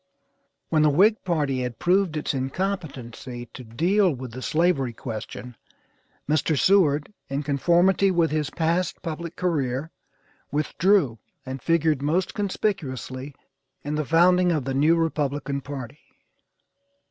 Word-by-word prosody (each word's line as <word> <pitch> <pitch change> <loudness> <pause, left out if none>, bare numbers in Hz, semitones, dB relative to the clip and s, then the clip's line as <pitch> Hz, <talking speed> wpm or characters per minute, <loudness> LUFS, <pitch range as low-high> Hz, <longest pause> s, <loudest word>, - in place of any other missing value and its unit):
When 155 - +3
the 150 - +5
Whig 205 +9 +4
party 150 -7 0
had 125 -2 -4
proved 180 - +2
its 150 - -2
incompetency 135 -5 -4
to 130 - -9
deal 175 - +2
with 130 -3 -6
the 130 +3 -8
slavery 155 -5 +1
question, 115 +1 -7 0.7
Mr. 155 +1 +1
Seward, 155 -2 +3 0.2
in 140 +2 -2
conformity 175 +7 +3
with 170 -4 +2
his 150 -2 -1
past 170 +3 -1
public 165 +1 -5
career, 150 -4 -1 0.6
withdrew 150 - +2 0.3
and 130 0 -6
figured 160 -3 +2
most 170 +6 0
conspicuously 145 - -3 0.5
in 145 - -3
the 155 0 0
founding 175 +4 +4
of 150 -6 -1
the 135 - -2
new 150 +5 +4
Republican 145 -4 -1
party. 140 -1 -7
150 Hz, 125 wpm, -24 LUFS, 135-175 Hz, 0.7 s, the